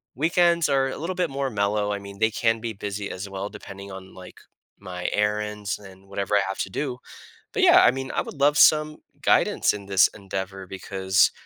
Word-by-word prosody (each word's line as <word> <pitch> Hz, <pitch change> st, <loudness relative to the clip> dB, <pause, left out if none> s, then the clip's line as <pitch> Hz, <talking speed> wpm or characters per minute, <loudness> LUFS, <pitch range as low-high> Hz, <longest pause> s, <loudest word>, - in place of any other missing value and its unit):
Weekends 170 Hz, +3 st, +3 dB
are 135 Hz, -1 st, +2 dB
a -, -, -5 dB
little 175 Hz, +4 st, -4 dB
bit 180 Hz, -2 st, 0 dB
more 135 Hz, 0 st, -2 dB
mellow, 105 Hz, -1 st, 0 dB
I 100 Hz, -, -3 dB
mean, 100 Hz, 0 st, -11 dB
they 110 Hz, 0 st, +3 dB
can 115 Hz, 0 st, +1 dB
be 115 Hz, -1 st, -4 dB
busy 100 Hz, 0 st, -5 dB
as 95 Hz, +2 st, -6 dB
well 95 Hz, +1 st, -5 dB
depending 100 Hz, 0 st, -10 dB
on, 95 Hz, 0 st, -10 dB
like, 90 Hz, -1 st, -12 dB, 0.4 s
my 90 Hz, -2 st, -5 dB
errands 105 Hz, -1 st, -1 dB
and 95 Hz, -1 st, -15 dB
whatever 100 Hz, +1 st, -1 dB
I -, -, +3 dB
have 95 Hz, -, -4 dB
to -, -, -2 dB
do. 130 Hz, -1 st, -3 dB, 0.5 s
But, -, -, -1 dB
yeah! -, -, +7 dB
I -, -, +7 dB
mean, 130 Hz, 0 st, -5 dB
I -, -, 0 dB
would 145 Hz, -, -10 dB
love 145 Hz, +1 st, +4 dB
some 155 Hz, 0 st, +5 dB, 0.2 s
guidance -, -, +3 dB
in 100 Hz, -1 st, -8 dB
this 95 Hz, -1 st, +5 dB
endeavor 95 Hz, -1 st, -6 dB
because 95 Hz, 0 st, +1 dB
105 Hz, 205 wpm, -24 LUFS, 95-130 Hz, 0.5 s, yeah